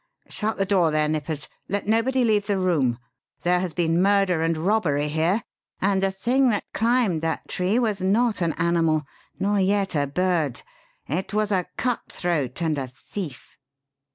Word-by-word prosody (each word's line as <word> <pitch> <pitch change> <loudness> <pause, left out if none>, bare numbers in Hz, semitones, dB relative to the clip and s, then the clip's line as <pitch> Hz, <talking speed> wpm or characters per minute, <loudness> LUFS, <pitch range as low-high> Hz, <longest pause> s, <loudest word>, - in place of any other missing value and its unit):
Shut 220 +1 -2
the 195 - +1
door 185 -4 +3
there, 155 0 +1
Nippers. 155 -1 -3 0.2
Let 200 +1 -1
nobody 235 +4 +2
leave 210 -3 +2
the 200 -2 +1
room. 155 -10 +1 0.5
There 180 0 +3
has 180 -1 -2
been 165 +1 +1
murder 195 -4 +3
and 165 0 +1
robbery 155 -5 +1
here; 165 +8 +1 0.4
and 195 0 +1
the 195 - +2
thing 245 +7 +2
that 210 -3 -2
climbed 225 -7 +2
that 165 0 -2
tree 185 +5 0
was 215 -6 0
not 210 +3 +2
an 165 -2 +1
animal 165 -2 +1 0.3
nor 200 +1 +1
yet 195 0 +1
a 145 -1 +1
bird. 165 -3 0 0.4
It 185 +7 -3
was 210 0 +1
a 185 -3 +1
cut 250 -2 0
throat 165 -4 -2
and 155 -3 0
a 130 - -3
thief!" 135 +3 -8
185 Hz, 170 wpm, -24 LUFS, 160-205 Hz, 0.5 s, door